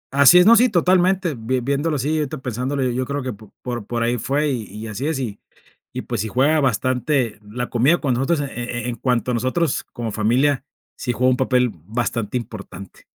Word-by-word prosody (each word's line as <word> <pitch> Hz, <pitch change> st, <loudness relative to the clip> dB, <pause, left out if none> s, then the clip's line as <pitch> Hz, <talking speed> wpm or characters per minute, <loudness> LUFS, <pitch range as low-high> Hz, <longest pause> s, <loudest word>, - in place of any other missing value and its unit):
Así 140 Hz, +5 st, +8 dB
es, 180 Hz, -, +7 dB
no, 230 Hz, -, +8 dB
sí, 245 Hz, +2 st, +5 dB
totalmente, 180 Hz, -1 st, +2 dB
vien 120 Hz, +2 st, -2 dB
viéndolo 145 Hz, +3 st, 0 dB
así, 145 Hz, +4 st, 0 dB
ahorita 150 Hz, 0 st, -3 dB
pensándolo, 130 Hz, +2 st, -2 dB
yo 125 Hz, 0 st, 0 dB
creo 140 Hz, +1 st, -3 dB
que 130 Hz, -3 st, -3 dB
por 110 Hz, +2 st, -8 dB
por 120 Hz, -1 st, -1 dB
ahí 120 Hz, 0 st, 0 dB
fue 145 Hz, +5 st, 0 dB
y 120 Hz, -4 st, -2 dB
y 105 Hz, +3 st, -8 dB
así 115 Hz, +8 st, -4 dB
es, 160 Hz, -, -1 dB
y 115 Hz, -6 st, -4 dB, 0.5 s
y 125 Hz, -, -5 dB
pues 120 Hz, -5 st, -3 dB
si 110 Hz, -, -2 dB
juega 140 Hz, +8 st, +2 dB
bastante 130 Hz, -1 st, 0 dB
la 115 Hz, +4 st, -5 dB
comida 135 Hz, +9 st, +3 dB
con 135 Hz, -4 st, 0 dB
nosotros 135 Hz, +6 st, +1 dB
e 145 Hz, -, -2 dB
e 120 Hz, 0 st, -4 dB
en 120 Hz, -, -3 dB
cuanto 125 Hz, -1 st, 0 dB
a -, -, -1 dB
nosotros 130 Hz, +6 st, 0 dB
como 115 Hz, -3 st, -4 dB
familia, 125 Hz, +6 st, +1 dB, 0.3 s
sí 125 Hz, -, -3 dB
juega 130 Hz, +3 st, +2 dB
un 125 Hz, -, +1 dB
papel 125 Hz, -2 st, +2 dB
bastante 110 Hz, +5 st, -3 dB
importante. 100 Hz, -5 st, -9 dB
125 Hz, 205 wpm, -21 LUFS, 115-145 Hz, 0.5 s, Así